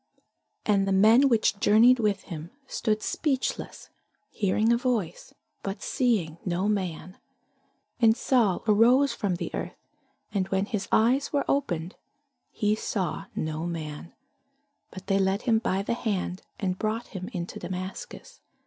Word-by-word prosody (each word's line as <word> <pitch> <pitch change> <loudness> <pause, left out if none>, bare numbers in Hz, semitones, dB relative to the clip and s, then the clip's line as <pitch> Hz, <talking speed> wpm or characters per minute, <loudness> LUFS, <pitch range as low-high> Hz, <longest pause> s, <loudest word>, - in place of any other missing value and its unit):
And 200 -2 +2
the - - +1
men 220 +8 +6
which 220 -3 +2
journeyed 235 +5 +5
with 210 -3 0
him 165 -1 -7 0.2
stood 215 -4 -1
speechless, 275 -4 -2 0.4
hearing 215 +3 +2
a - - +4
voice, 230 -9 -2 0.3
but 195 +1 -5
seeing 205 - 0
no 180 +2 -1
man. 185 -3 -3 0.8
And 225 -1 +5
Saul 225 -9 +2
arose 245 +6 +5
from 195 -3 -1
the - - -5
earth; - - -4 0.6
and 190 -3 0
when 195 0 0
his 205 -2 -3
eyes 250 +5 +3
were 285 -2 0
opened, 180 - -1 0.5
he 210 0 0
saw 195 -5 -2
no 155 +1 -3
man: 160 -1 -6 0.8
but 190 - -10
they 195 0 +2
led 195 +2 +1
him 230 -3 +3
by 195 -3 -1
the 220 - -1
hand, 200 -6 -2 0.2
and 185 -4 -2
brought 220 +2 -2
him 190 -1 -6
into 175 -2 -5
Damascus. 185 - -7
200 Hz, 140 wpm, -27 LUFS, 185-230 Hz, 0.8 s, men